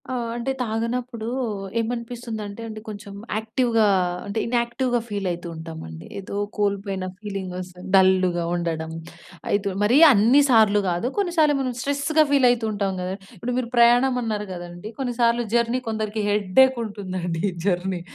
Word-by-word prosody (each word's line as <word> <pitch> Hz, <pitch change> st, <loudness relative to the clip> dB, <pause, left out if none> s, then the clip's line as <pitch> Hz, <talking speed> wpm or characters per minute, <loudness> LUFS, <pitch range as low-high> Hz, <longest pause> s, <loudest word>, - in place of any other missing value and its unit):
ఆహ్. 240 Hz, -2 st, -2 dB
అంటే 240 Hz, +3 st, -2 dB
తాగనప్పుడు 230 Hz, +1 st, -3 dB, 0.5 s
ఏమనిపిస్తుందంటే 230 Hz, -2 st, -4 dB
అండి 215 Hz, -1 st, -7 dB
కొంచెం 205 Hz, -1 st, -8 dB, 0.2 s
యాక్టివ్‌గా 225 Hz, 0 st, +1 dB, 0.4 s
అంటే 200 Hz, +2 st, -2 dB
ఇన్‌యాక్టివ్‌గా 240 Hz, +1 st, 0 dB
ఫీల్ 200 Hz, -2 st, -2 dB
అయితూ 175 Hz, 0 st, -5 dB
ఉంటామండి. 160 Hz, -, -8 dB
ఏదో 195 Hz, +1 st, -7 dB, 0.2 s
కోల్పోయిన 200 Hz, -2 st, -1 dB
ఫీలింగ్ 195 Hz, -3 st, -5 dB
వస్తుంది. 180 Hz, 0 st, -8 dB
డల్‌గా 185 Hz, -2 st, +4 dB
ఉండడం 165 Hz, -2 st, -2 dB, 0.6 s
అయితు 200 Hz, 0 st, +1 dB
మరి 230 Hz, +6 st, +4 dB, 0.2 s
అన్ని 235 Hz, +7 st, +5 dB
సార్లు 215 Hz, -4 st, +5 dB
గాదు. 175 Hz, +6 st, -1 dB
కొన్నిసార్లు 335 Hz, -7 st, +3 dB
మనం 255 Hz, -2 st, -2 dB
స్ట్రెస్‌గా 285 Hz, +3 st, +2 dB
ఫీల్ 275 Hz, -3 st, +5 dB
అయితూ 235 Hz, -2 st, -1 dB
ఉంటాం 200 Hz, -2 st, -1 dB
గదా. 180 Hz, +1 st, -3 dB, 0.2 s
ఇప్పుడు 245 Hz, +7 st, -3 dB
మీరు 250 Hz, -2 st, -2 dB
ప్రయాణం 240 Hz, +2 st, +5 dB
అన్నారు 210 Hz, -3 st, -2 dB
గదండీ. 175 Hz, +3 st, -8 dB
కొన్నిసార్లు 240 Hz, -2 st, +1 dB
జర్నీ 235 Hz, +1 st, +2 dB
కొందరికి 215 Hz, -1 st, -2 dB
హెడ్డేక్ 210 Hz, +6 st, +4 dB
ఉంటుందండి 185 Hz, -5 st, -4 dB, 0.2 s
జర్నీ. 180 Hz, -1 st, 0 dB
215 Hz, 135 wpm, -23 LUFS, 190-240 Hz, 0.6 s, అన్ని